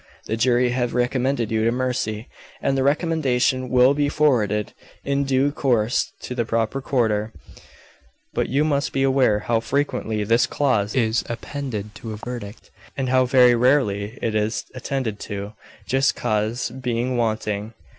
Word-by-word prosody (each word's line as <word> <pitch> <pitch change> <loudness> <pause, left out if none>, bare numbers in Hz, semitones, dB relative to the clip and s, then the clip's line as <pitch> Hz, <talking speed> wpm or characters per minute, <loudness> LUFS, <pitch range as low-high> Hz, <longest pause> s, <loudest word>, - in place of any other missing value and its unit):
The 110 - -2
jury 120 +1 +2
have 120 -1 -1
recommended 125 -1 0
you 110 -1 +1
to 115 - +3
mercy, 120 -3 -2 0.3
and 135 - 0
the 135 - +1
recommendation 135 -4 +1
will 125 +2 +5
be 145 0 +1
forwarded 110 -9 +1 0.3
in 140 0 0
due 135 +1 +2
course 120 -6 +1
to - - -5
the 120 -1 0
proper 115 +3 -1
quarter, 110 -5 0 1.0
but - - -1
you 140 +4 +2
must 140 -2 0
be 135 - +1
aware 130 -6 +3
how 115 0 +1
frequently 115 -4 -1
this 115 +3 +3
clause 110 -8 0
is 115 -3 +2
appended 115 -4 -5
to 110 0 -7
a - - -6
verdict, 120 -2 -8 0.3
and 130 -2 -1
how 130 0 +4
very 125 -1 +6
rarely 120 -4 +1
it 115 - 0
is 110 +1 0
attended 130 -4 -3
to, 100 +1 -6 0.3
just 135 0 +2
cause 110 +3 -1
being 125 0 -2
wanting. 110 -2 -2
125 Hz, 155 wpm, -22 LUFS, 110-135 Hz, 1.0 s, very